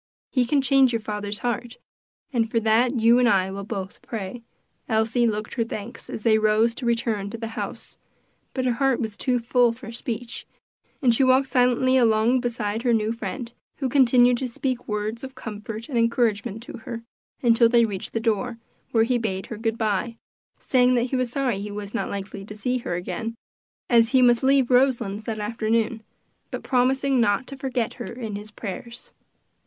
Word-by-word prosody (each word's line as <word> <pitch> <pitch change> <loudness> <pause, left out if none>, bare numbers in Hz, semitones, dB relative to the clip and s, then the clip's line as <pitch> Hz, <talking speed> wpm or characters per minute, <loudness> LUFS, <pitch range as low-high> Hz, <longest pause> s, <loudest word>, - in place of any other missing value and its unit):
He 255 -2 +2
can 275 +1 +2
change 265 -1 +4
your 230 - 0
father's 210 -1 -3
heart, 240 0 -2 0.6
and 225 -2 +1
for 230 - +1
that 230 +3 +2
you 230 +2 +5
and 245 -1 +4
I 190 -3 +2
will 200 +1 -5
both 195 -1 -6
pray." 225 +1 -6 0.5
Elsie 225 +2 +2
looked 215 -1 -3
her 235 - 0
thanks 225 0 -7
as 215 - -6
they 220 -1 +4
rose 215 +2 +3
to 240 0 -5
return 230 -4 0
to 230 - -6
the 225 0 -5
house, 225 - -6 0.6
but 260 -1 -1
her 250 - +3
heart 270 0 +1
was 220 -3 -3
too 250 +2 0
full 245 0 +3
for 230 0 -9
speech, 235 0 -5 0.6
and 245 -2 +5
she 250 - +3
walked 260 +1 +4
silently 255 0 +3
along 230 +1 +3
beside 230 -3 -2
her 240 -2 +3
new 215 0 0
friend, 235 +1 -5 0.2
who 265 -2 -2
continued 245 -2 +5
to 260 - -2
speak 250 +1 -3
words 215 +3 -3
of 265 0 -8
comfort 220 -1 -7
and 255 -6 0
encouragement 230 -2 0
to 240 - -9
her, 230 0 -7 0.4
until 230 -1 +5
they 235 -1 +5
reached 200 -4 -5
the 225 - 0
door, 230 +1 -1 0.3
where 225 -1 +4
he 240 +1 +1
bade 190 -4 -2
her 230 - -7
good 225 0 -1
by, 220 +1 -1 0.4
saying 255 -1 +3
that 240 +1 0
he - - +1
was 255 -1 0
sorry 250 -7 -1
he 210 - -5
was 205 0 -6
not 235 - -2
likely 200 0 -6
to 210 +1 -9
see 250 +4 -1
her 175 -7 -3
again, 225 +6 -4 0.5
as 230 -2 +4
he 260 -1 +4
must 240 -1 +5
leave 265 -1 +3
Roselands 235 -5 +2
that 225 -2 -3
afternoon, 225 +1 -1 0.5
but - - -6
promising 265 +1 +2
not 205 +3 +2
to 275 - -8
forget 260 -4 -2
her - - -7
in 225 -4 -5
his 205 +1 -7
prayers. 235 +3 -8
230 Hz, 190 wpm, -24 LUFS, 215-250 Hz, 0.6 s, you